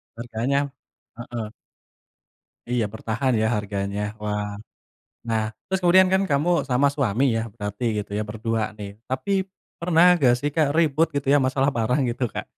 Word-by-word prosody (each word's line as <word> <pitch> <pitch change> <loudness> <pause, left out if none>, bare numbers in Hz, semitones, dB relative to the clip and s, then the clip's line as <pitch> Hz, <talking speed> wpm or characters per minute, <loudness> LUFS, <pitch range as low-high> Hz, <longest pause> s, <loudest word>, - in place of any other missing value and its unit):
Harganya. 125 +5 -1 0.5
Heeh. 120 -2 -5 1.2
Iya 125 -2 +1
bertahan 115 +4 -1
ya - - +2
harganya. 100 -1 -3 0.2
Wah. 105 0 -2 0.8
Nah 115 -1 +1 0.3
terus 190 0 0
kemudian 185 +1 +6
kan 190 - +4
kamu 145 +4 +2 0.2
sama 130 +3 +3
suami 130 -3 +1
ya 115 - 0
berarti 105 0 -5
gitu 105 -1 -5
ya - - 0
berdua 115 +1 -2 0.2
nih. 105 -1 -6 0.2
Tapi 130 +10 -2 0.5
pernah 170 0 +4 0.2
gak 120 - +6
sih 145 - -1
Kak 155 -3 +3
ribut 160 0 +3
gitu 140 -1 -2
ya - - +6
masalah 135 +1 +2
barang 115 +5 +1
gitu 120 +2 -3
Kak? - - -4
125 Hz, 155 wpm, -24 LUFS, 110-145 Hz, 1.2 s, kemudian